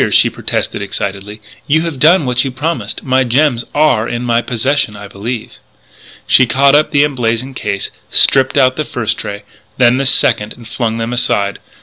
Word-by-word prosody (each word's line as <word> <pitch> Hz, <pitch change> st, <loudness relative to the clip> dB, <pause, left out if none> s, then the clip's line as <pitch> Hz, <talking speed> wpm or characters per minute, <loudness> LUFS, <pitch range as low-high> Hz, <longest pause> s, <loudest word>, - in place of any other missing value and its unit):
she -, -, +3 dB
protested -, -, -3 dB
excitedly, 100 Hz, +1 st, -5 dB, 0.3 s
"you 155 Hz, +3 st, +2 dB
have 165 Hz, -6 st, -5 dB
done 165 Hz, +2 st, +4 dB
what 125 Hz, -1 st, 0 dB
you 135 Hz, -, -2 dB
promised. 150 Hz, +6 st, -4 dB
My 130 Hz, 0 st, +2 dB
gems 125 Hz, 0 st, +1 dB
are 145 Hz, -7 st, +2 dB
in 120 Hz, +1 st, -4 dB
my 120 Hz, -1 st, +1 dB
possession 125 Hz, -1 st, -1 dB
I 100 Hz, 0 st, -9 dB
believe 110 Hz, +4 st, -6 dB, 0.3 s
" -, -, -28 dB, 0.3 s
She 130 Hz, -, +4 dB
caught 135 Hz, +4 st, +3 dB
up 150 Hz, +1 st, +3 dB
the 145 Hz, -1 st, +3 dB
emblazoned 130 Hz, -2 st, -2 dB
case, 100 Hz, -4 st, -3 dB, 0.2 s
stripped 130 Hz, +1 st, +4 dB
out 130 Hz, -2 st, +3 dB
the 155 Hz, -, -1 dB
first 115 Hz, -6 st, -2 dB
tray, 100 Hz, 0 st, -6 dB, 0.3 s
then 125 Hz, 0 st, +4 dB
the 135 Hz, 0 st, 0 dB
second, 115 Hz, -5 st, +2 dB
and 120 Hz, -2 st, -14 dB
flung 115 Hz, -1 st, -3 dB
them 115 Hz, +1 st, -3 dB
aside. 100 Hz, -5 st, -1 dB
125 Hz, 185 wpm, -14 LUFS, 110-135 Hz, 0.3 s, done